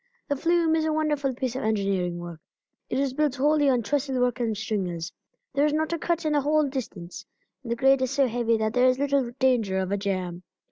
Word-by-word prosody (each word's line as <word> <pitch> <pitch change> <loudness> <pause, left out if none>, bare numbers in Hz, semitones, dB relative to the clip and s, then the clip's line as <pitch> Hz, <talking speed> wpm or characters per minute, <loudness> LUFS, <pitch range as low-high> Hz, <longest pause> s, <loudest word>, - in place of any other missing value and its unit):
The 285 - +1
flume 335 +2 +2
is 320 - +1
a 315 - 0
wonderful 295 -4 0
piece 255 -1 -3
of 260 - -2
engineering 195 -5 0
work. 175 -2 -8 0.5
It - - -1
is 275 -1 0
built 295 -1 0
wholly 290 +1 +3
on 245 -3 +2
trestle 270 +2 -1
work 250 0 +1
and 225 -3 -1
stringers; 185 -5 -3 0.4
there 280 +1 +2
is 295 - -1
not 315 +2 0
a 335 - -2
cut 340 0 -1
in 305 - +1
the 290 - +3
whole 300 +1 +2
distance, 215 -10 -6 0.4
and 235 -3 -7
the - - +1
grade 270 +2 +4
is 260 - +1
so 275 +1 +2
heavy 230 -1 +1
that 220 0 -1
there 250 +1 +4
is 255 0 +3
little 280 -2 +1
danger 240 -8 +2
of 190 0 -1
a 200 - +1
jam. 185 -3 -3
255 Hz, 230 wpm, -26 LUFS, 215-290 Hz, 0.5 s, grade